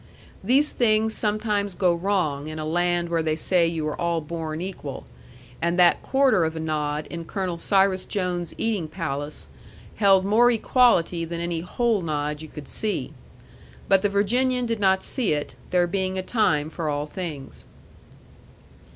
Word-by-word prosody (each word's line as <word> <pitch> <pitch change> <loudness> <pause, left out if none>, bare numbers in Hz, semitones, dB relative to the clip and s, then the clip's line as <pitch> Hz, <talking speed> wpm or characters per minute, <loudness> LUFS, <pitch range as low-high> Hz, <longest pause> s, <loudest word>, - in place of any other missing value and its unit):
These 270 +8 +3
things 220 -2 +2
sometimes 210 -2 -1
go 180 -1 +3
wrong 170 -6 -1
in 155 0 -6
a 155 - -4
land 175 +1 0
where 165 -1 +1
they 155 -1 0
say 170 +1 +2
you 160 -2 -2
are 150 - -4
all 170 -1 +1
born 160 0 -5
equal; 185 +1 -6 0.6
and 170 +1 0
that 175 -1 +5
quarter 265 -9 +3
of 160 0 -1
a - - -4
nod 150 -1 -2
in 170 -1 -5
Colonel 180 0 -3
Cyrus 190 0 +2
Jones's 180 -3 -3
eating 210 -8 -1
palace 150 -3 -4 0.5
held 195 -2 +4
more 225 +4 +5
equality 225 -8 +3
than 170 0 -4
any 170 -1 -2
whole 220 +4 0
nod 150 -2 -2
you 160 - -8
could 150 -1 -10
see. 215 -2 -3 0.7
But 195 -1 +4
the 205 - +1
Virginian 245 +5 +1
did 230 -2 -2
not 190 -1 +3
see 235 - 0
it, 145 -3 -3 0.2
there 180 -1 +3
being 190 +1 -2
a 185 - -2
time 160 -9 +1
for 160 -2 -3
all 145 0 -1
things. 150 -4 -7
175 Hz, 165 wpm, -24 LUFS, 160-205 Hz, 0.7 s, that